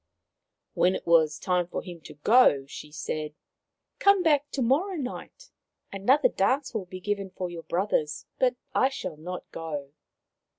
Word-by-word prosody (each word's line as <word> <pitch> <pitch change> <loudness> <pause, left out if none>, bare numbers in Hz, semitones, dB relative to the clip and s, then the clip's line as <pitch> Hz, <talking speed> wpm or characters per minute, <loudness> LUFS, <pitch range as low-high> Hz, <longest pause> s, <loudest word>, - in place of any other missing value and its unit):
When 185 +1 +3
it - - -6
was 160 -3 +4
time 180 -2 0
for - - -5
him 175 -2 -9
to - - -10
go 150 - +5
she 150 +2 -10
said: 155 0 -4 0.3
" - - -57
Come 400 -2 +5
back 290 -3 +3
to 270 - 0
morrow 315 +11 +1
night. 320 - -7 0.4
Another 255 +8 +4
dance 255 +6 0
will 205 -5 -3
be 185 +1 -8
given 200 0 -2
for 185 -1 -5
your 170 -1 -7
brothers, 170 -4 -1
but 255 -1 +3 0.2
I 260 - +3
shall 185 - -6
not 180 +4 -6
go." 145 -4 -6
185 Hz, 165 wpm, -27 LUFS, 165-260 Hz, 0.4 s, go